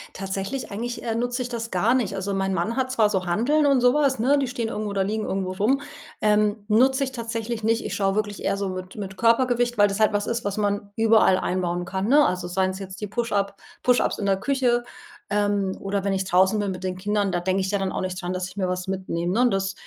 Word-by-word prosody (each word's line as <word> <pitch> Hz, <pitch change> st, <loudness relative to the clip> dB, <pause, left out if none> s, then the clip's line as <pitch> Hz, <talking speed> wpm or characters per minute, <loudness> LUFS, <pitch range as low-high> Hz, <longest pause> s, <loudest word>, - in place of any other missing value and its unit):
Tatsächlich 195 Hz, +7 st, -4 dB
eigentlich, 235 Hz, +4 st, -4 dB
äh, 225 Hz, -1 st, -2 dB
nutze 245 Hz, +2 st, -1 dB
ich 245 Hz, -, -3 dB
das 230 Hz, -1 st, -5 dB
gar 210 Hz, +7 st, +2 dB
nicht. 245 Hz, -7 st, 0 dB
Also, 195 Hz, +1 st, -2 dB
mein 195 Hz, 0 st, 0 dB
Mann 190 Hz, +6 st, -1 dB
hat 260 Hz, -1 st, 0 dB
zwar 220 Hz, -5 st, +3 dB
so 190 Hz, -3 st, -1 dB
Hanteln 245 Hz, -, +2 dB
und 275 Hz, -3 st, +4 dB
sowas, 265 Hz, 0 st, +3 dB
ne? 275 Hz, +5 st, +3 dB
Die 275 Hz, -, 0 dB
stehen 240 Hz, -2 st, -3 dB
irgendwo 210 Hz, -2 st, -3 dB
oder 195 Hz, -1 st, 0 dB
liegen 215 Hz, +3 st, -2 dB
irgendwo 190 Hz, -1 st, -2 dB
rum. 235 Hz, +9 st, +1 dB, 0.4 s
Ähm, 210 Hz, 0 st, +2 dB
nutze 260 Hz, +6 st, +3 dB
ich 265 Hz, -, -3 dB
tatsächlich 230 Hz, -1 st, -4 dB
nicht, 225 Hz, +1 st, +1 dB
ich -, -, -4 dB
schaue 195 Hz, -2 st, +1 dB
wirklich 205 Hz, -1 st, -2 dB
eher -, -, +1 dB
so 200 Hz, -1 st, -2 dB
mit 185 Hz, 0 st, -7 dB
mit 195 Hz, -2 st, -6 dB
Körpergewicht, 240 Hz, +1 st, +2 dB
weil 205 Hz, -, +7 dB
das 200 Hz, +2 st, -3 dB
halt 215 Hz, -1 st, +3 dB
was 205 Hz, 0 st, 0 dB
ist, 235 Hz, -1 st, -2 dB
was 205 Hz, 0 st, -2 dB
man 205 Hz, -1 st, -1 dB
überall 225 Hz, -4 st, +4 dB
einbauen 175 Hz, -1 st, -1 dB
kann, 190 Hz, +2 st, -2 dB
ne? 295 Hz, +3 st, +6 dB
Also, 180 Hz, -1 st, -2 dB
seien 185 Hz, +1 st, 0 dB
es 190 Hz, +1 st, -5 dB
jetzt 195 Hz, +1 st, -8 dB
die 210 Hz, -, -3 dB
Push-up 200 Hz, -3 st, -1 dB, 0.3 s
Push-ups 250 Hz, -1 st, +2 dB
in 200 Hz, -, -1 dB
der 195 Hz, -1 st, +3 dB
Küche, 245 Hz, 0 st, +1 dB, 0.5 s
ähm, 205 Hz, -2 st, +1 dB
oder 195 Hz, 0 st, -2 dB
wenn 200 Hz, -1 st, 0 dB
ich 190 Hz, 0 st, -1 dB
draußen 190 Hz, +3 st, +3 dB
bin 205 Hz, -1 st, -1 dB
mit 185 Hz, -1 st, -5 dB
den 185 Hz, -1 st, -2 dB
Kindern, 205 Hz, +1 st, 0 dB
da 175 Hz, -, 0 dB
denke 190 Hz, +2 st, 0 dB
ich 190 Hz, +1 st, -2 dB
ja 200 Hz, -, 0 dB
dann 195 Hz, -1 st, -1 dB
auch -, -, -3 dB
nicht 185 Hz, 0 st, -4 dB
dran, 180 Hz, 0 st, -3 dB
dass 185 Hz, 0 st, -3 dB
ich 185 Hz, -, -13 dB
mir 190 Hz, -2 st, -1 dB
was 180 Hz, 0 st, -3 dB
mitnehme, 185 Hz, -2 st, -2 dB
ne? 245 Hz, -, +4 dB
Das 195 Hz, -1 st, -1 dB
205 Hz, 250 wpm, -24 LUFS, 190-235 Hz, 0.5 s, weil